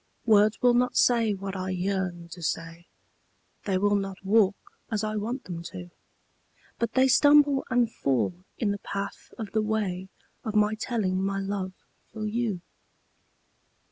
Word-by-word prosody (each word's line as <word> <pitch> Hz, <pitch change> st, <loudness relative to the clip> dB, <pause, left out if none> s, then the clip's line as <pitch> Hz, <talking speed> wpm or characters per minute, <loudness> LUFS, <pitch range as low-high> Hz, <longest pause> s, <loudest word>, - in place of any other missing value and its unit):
Words 215 Hz, -1 st, +4 dB
will 245 Hz, -1 st, +6 dB
not 250 Hz, +1 st, +2 dB
say 230 Hz, -4 st, +4 dB
what 195 Hz, 0 st, -5 dB
I 185 Hz, 0 st, -3 dB
yearn 185 Hz, -2 st, -2 dB
to 175 Hz, +1 st, -10 dB
say 165 Hz, +1 st, -4 dB, 0.8 s
They 195 Hz, -2 st, +1 dB
will 205 Hz, +2 st, +2 dB
not 195 Hz, -2 st, -1 dB
walk 200 Hz, -1 st, +4 dB, 0.3 s
as 220 Hz, -2 st, -1 dB
I 215 Hz, 0 st, -2 dB
want 230 Hz, +5 st, -3 dB
them 170 Hz, -2 st, -6 dB
to, 175 Hz, +1 st, -8 dB, 0.9 s
But 230 Hz, -1 st, -1 dB
they 260 Hz, 0 st, +5 dB
stumble 290 Hz, 0 st, +5 dB
and 245 Hz, -3 st, +2 dB
fall 130 Hz, -, 0 dB, 0.2 s
in 210 Hz, -3 st, 0 dB
the 200 Hz, -, -3 dB
path 200 Hz, +1 st, -6 dB
of 220 Hz, -4 st, -6 dB
the 220 Hz, -, +1 dB
way 200 Hz, -4 st, -2 dB, 0.3 s
Of 220 Hz, -3 st, -4 dB
my 210 Hz, 0 st, +4 dB
telling 215 Hz, -5 st, -1 dB
my 195 Hz, 0 st, -1 dB
love 195 Hz, -1 st, -3 dB, 0.4 s
for 215 Hz, -1 st, -5 dB
you. 215 Hz, -4 st, -1 dB
205 Hz, 155 wpm, -27 LUFS, 185-225 Hz, 0.9 s, will